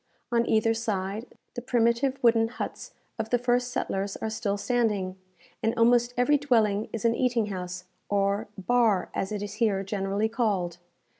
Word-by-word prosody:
On 235 0 +2
either 225 +1 +3
side, 215 -1 -3 0.3
the 245 - -5
primitive 240 +2 +1
wooden 225 -1 +5
huts 235 - -6 0.3
of 225 0 -2
the 245 - +3
first 245 0 +1
settlers 195 -5 -2
are 220 - -3
still 210 -2 -1
standing, 210 -5 0 0.5
and 225 +1 0
almost 240 +1 +4
every 285 +4 +4
dwelling 220 -7 +2
is 230 - -4
an 230 - +4
eating 240 -2 +1
house, 180 -1 -5 0.3
or 200 +1 +1
"bar," 215 -1 +2
as 190 - -2
it 205 -1 -3
is 205 0 -5
here 200 -4 +2
generally 195 +1 -1
called. 200 -7 -1
225 Hz, 160 wpm, -27 LUFS, 200-240 Hz, 0.5 s, wooden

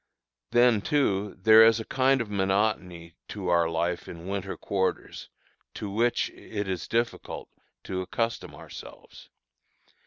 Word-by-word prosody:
Then, 120 -2 +4
too, 105 -8 0
there 110 +3 +8
is 115 0 +5
a 110 - -5
kind 135 0 +2
of 115 - -5
monotony 95 -4 -1
to 95 -4 -5
our 85 -1 +3
life 85 +1 -2
in 85 0 -9
winter 95 -1 -4
quarters, 95 -2 -3 0.5
to 100 - -5
which 115 +4 +1
it 105 -2 -6
is 95 -3 -3
difficult 115 +1 -2 0.3
to 95 -1 -3
accustom 115 +5 -3
ourselves. - - -12
100 Hz, 130 wpm, -27 LUFS, 95-115 Hz, 0.5 s, there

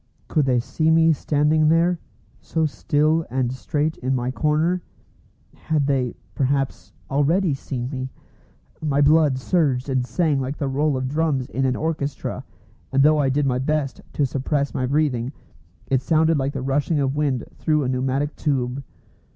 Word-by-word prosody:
Could 150 -3 +1
they 125 -2 +3
see 155 +6 0
me 160 0 +5
standing 150 +1 +2
there, 170 +2 +3 0.4
so 160 -1 -1
still 155 +2 +1
and 125 0 -1
straight 150 +4 -2
in 130 +1 -1
my 125 0 -1
corner? 155 +6 +1 0.7
Had 155 -3 -1
they, 130 -4 0 0.2
perhaps, 135 0 -1 0.2
already 155 +5 +2
seen 125 -2 -4
me? 130 -1 -4 0.7
My 145 -3 0
blood 145 -1 +4
surged 135 -3 0
and 130 -2 +1
sang 150 +2 0
like 135 +2 -3
the 140 - -2
roll 140 +1 +1
of 130 0 -2
drums 145 -2 0
in 135 +1 -1
an 130 -1 +1
orchestra; 150 -3 -3 0.5
and 135 0 +3
though 155 +1 +5
I 140 -2 +2
did 145 +2 +1
my 125 -2 +1
best 145 0 -1
to 145 - +1
suppress 140 +2 -1
my 130 -3 -1
breathing, 135 -3 0 0.5
it 130 -1 +1
sounded 160 +2 +3
like 135 +1 -1
the 135 - -4
rushing 145 +3 0
of 135 0 0
wind 140 -5 0 0.2
through 155 -2 +1
a - - -1
pneumatic 130 +3 -1
tube. 135 -2 -1
140 Hz, 165 wpm, -22 LUFS, 130-155 Hz, 0.7 s, me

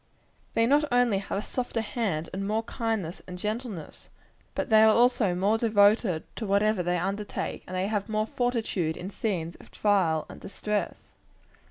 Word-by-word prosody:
They 230 - +4
not 290 +5 +4
only 245 -5 +3
have 195 - -4
a 205 - -2
softer 245 -2 -2
hand, 205 -8 -2
and 195 +1 -3
more 220 +2 0
kindness 225 -7 -3
and 180 -1 -7
gentleness, 210 - -5 0.5
but - - -2
they 220 0 +7
are 220 0 +6
also 240 -6 +3
more 200 +5 +2
devoted 205 -5 +3
to 225 - -3
whatever 200 0 +2
they 175 0 0
undertake; 200 +4 -3
and 185 - -6
they 185 +1 0
have 205 0 -2
more 215 0 +1
fortitude 220 -9 -1
in 180 +3 -6
scenes 175 -7 -2
of - - -16
trial 185 -7 +1
and - - -11
distress. 210 +1 -2
210 Hz, 170 wpm, -27 LUFS, 185-225 Hz, 0.5 s, they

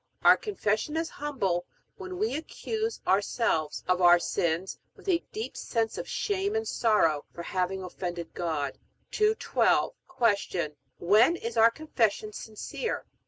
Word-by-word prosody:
Our - - +9
Confession 300 - -1
is 325 0 -1
humble, 200 -12 -2 0.3
when 370 -1 -7
we 430 +4 0
accuse 440 +8 -3
our 195 +2 +4
selves 160 -8 -1
of 180 0 +2
our 175 0 +8
sins, 170 +1 -1 0.2
with - - -18
a 350 -3 +2
deep 440 +2 -5
sense 225 -2 -1
of - - -5
shame 400 0 -1
and 445 0 -1
sorrow 165 -10 +2
for 170 - -6
having 185 +1 -2
offended 175 -2 -5
God. 155 -5 -2 0.3
212. 430 +1 +2 0.6
Q. 155 -4 -2 0.2
When 215 - +5
is 235 -8 -5
our 225 0 +7
Confession 225 -7 -1
sincere? 220 - -4
220 Hz, 140 wpm, -28 LUFS, -, 0.6 s, Our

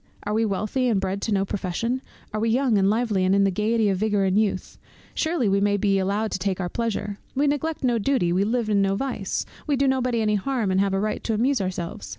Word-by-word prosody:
Are 210 - -2
we 225 +1 +2
wealthy, 215 +5 -1
and 220 -5 +2
bred 195 +1 -2
to 225 - -2
no 195 -1 +2
profession? 205 +7 -2 0.3
Are 215 - -1
we 225 +1 +1
young 250 0 +2
and 195 0 +3
lively, 215 -3 +1
and 185 +1 +3
in 200 - +4
the 195 - +2
gaiety 215 +3 +1
and 195 - +2
vigour 205 -2 +1
of 190 0 +1
youth? 205 -3 -1 0.3
Surely 320 -8 0
we 195 0 +2
may 205 0 +2
be 195 -1 +2
allowed 205 +3 -1
to - - -2
take 190 0 -1
our 180 -2 -2
pleasure. 205 -2 -3 0.2
We 280 +2 +2
neglect 295 +2 -1
no 240 -3 +2
duty, 205 -7 +1
we 190 +2 +2
live 230 +2 0
in 205 -2 +2
no 195 0 +1
vice, 230 -4 -2 0.2
we 290 - +2
do 275 +1 +2
nobody 255 -3 +1
any 210 -1 +1
harm, 240 -5 -1
and 185 - +2
have 195 -1 +1
a - - +1
right 215 +1 -2
to 225 - 0
amuse 255 +2 +1
ourselves. 180 -3 -4
210 Hz, 250 wpm, -24 LUFS, 195-240 Hz, 0.3 s, in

